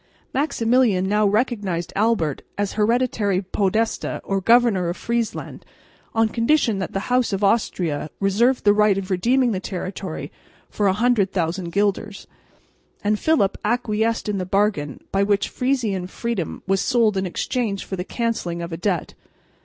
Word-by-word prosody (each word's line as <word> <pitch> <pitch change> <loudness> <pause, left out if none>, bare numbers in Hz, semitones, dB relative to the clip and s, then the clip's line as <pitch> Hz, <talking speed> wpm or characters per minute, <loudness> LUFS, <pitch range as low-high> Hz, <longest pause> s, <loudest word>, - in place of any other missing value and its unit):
Maximilian 240 -8 +2
now 210 +1 +3
recognised 200 -6 -1
Albert 200 - +1 0.2
as 205 -1 -1
hereditary 215 -3 +1
Podesta 200 +4 -1
or 195 -1 -1
governor 225 -5 +4
of 175 - -4
Friesland 235 -1 -3 0.5
on 225 0 +4
condition 230 -1 +1
that 190 - -4
the 195 - -1
House 250 -2 +2
of 195 +1 -2
Austria 180 -8 0
reserved 225 +6 +2
the 205 - +5
right 210 -1 +3
of 195 0 -4
redeeming 240 +7 +2
the 190 - -1
territory 185 -2 -5 0.4
for 205 - +1
100,000 190 -5 +1
guilders; 200 +1 -1 0.8
and 210 0 +1
Philip 305 -12 +2
acquiesced 225 -1 0
in 205 -2 -1
the - - -1
bargain 195 -8 0
by 195 - +1
which 200 0 +1
Frisian 230 -8 -1
freedom 230 -4 -4
was 195 0 +1
sold 230 -5 +2
in 190 -1 -1
exchange 205 +2 -2
for 190 - -4
the 180 - -3
cancelling 185 -7 -2
of 170 0 -6
a - - -3
debt. 180 -3 -1
205 Hz, 145 wpm, -22 LUFS, 190-230 Hz, 0.8 s, the